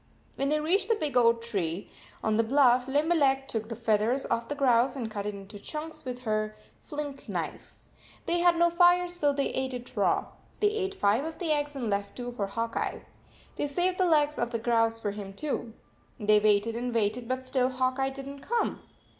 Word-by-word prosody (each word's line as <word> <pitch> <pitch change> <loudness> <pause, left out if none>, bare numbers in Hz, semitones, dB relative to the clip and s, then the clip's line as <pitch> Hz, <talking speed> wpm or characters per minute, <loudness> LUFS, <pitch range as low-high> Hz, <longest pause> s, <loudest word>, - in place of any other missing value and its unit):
When 275 +1 0
they 305 +1 +2
reached 345 +9 +1
the 455 - +4
big 305 -9 -3
oak 230 -1 +4
tree 195 -5 -3 0.3
on 220 -1 +2
the 225 - +4
bluff, 250 0 +4
Limberleg 280 -2 +2
took 220 -1 -3
the 230 - -4
feathers 225 +3 +1
off 230 0 0
the 290 - -3
grouse 250 -2 +3
and 235 -5 -4
cut 205 -1 -4
it 210 - -3
into 200 +1 -10
chunks 310 +8 -6
with 250 -1 -5
her 215 -2 -1 0.3
flint 290 -2 -6
knife. - - -5 0.5
They 345 +1 +1
had 350 0 +5
no 345 0 +4
fire, 355 +1 +5
so 350 -5 +1
they 280 0 0
ate 260 -1 -2
it 245 0 -9
raw. - - +2 0.3
They 415 - +4
ate 395 -2 -2
five 215 - +2
of 320 0 -5
the 340 -4 -1
eggs 295 -1 0
and 250 -4 -3
left 200 -1 -2
two 245 -1 -4
for 210 -5 -3
Hawk 230 +3 -3
Eye. - - -2 0.5
They 290 - 0
saved 360 +6 0
the 370 - +4
legs 300 -2 +3
of 235 - 0
the 235 - -2
grouse 225 -1 +1
for 205 -2 -2
him, 200 -1 -7
too. 245 -4 -3 0.5
They 210 -1 +4
waited 210 +2 +2
and 240 0 -3
waited, 230 +2 0
but 260 +1 -2
still 255 -1 +1
Hawk 255 0 0
Eye 270 0 +2
did 270 0 -8
not 280 0 -8
come. 470 0 -1
255 Hz, 215 wpm, -28 LUFS, 225-295 Hz, 0.5 s, had